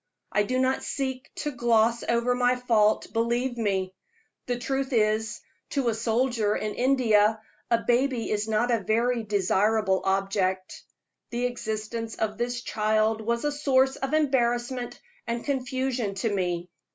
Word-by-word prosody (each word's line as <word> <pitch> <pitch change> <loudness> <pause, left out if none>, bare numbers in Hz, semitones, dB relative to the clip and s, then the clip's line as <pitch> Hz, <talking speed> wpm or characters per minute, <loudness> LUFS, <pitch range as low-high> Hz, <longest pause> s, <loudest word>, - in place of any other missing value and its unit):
I 210 - +2
do 255 +5 -1
not 260 +1 +1
seek 260 -2 -3
to 295 - -3
gloss 235 -2 +2
over 235 +1 +2
my 245 0 +2
fault, 225 -4 +2
believe 240 +2 0
me. 195 -5 -1 0.5
The 245 -1 -1
truth 270 +2 -2
is, 215 -1 +1 0.3
to 275 -4 0
a - - +1
soldier 225 -1 +1
in 215 -1 -2
India 225 -5 +3 0.3
a 230 -1 +2
baby 245 -1 +1
is 210 0 0
not 220 +3 +1
a 230 - +2
very 230 +4 +1
desirable 205 -1 +1
object. 190 -1 -1 0.4
The 240 +1 -1
existence 225 -1 -4
of 215 0 -2
this 245 0 -2
child 215 +1 +1
was 235 +4 -1
a 295 - +1
source 270 -2 +2
of 270 +3 -2
embarrassment 245 -4 0 0.3
and 235 0 -3
confusion 260 -5 -1
to 205 +2 -1
me. 175 -2 -2
235 Hz, 145 wpm, -26 LUFS, 215-250 Hz, 0.5 s, India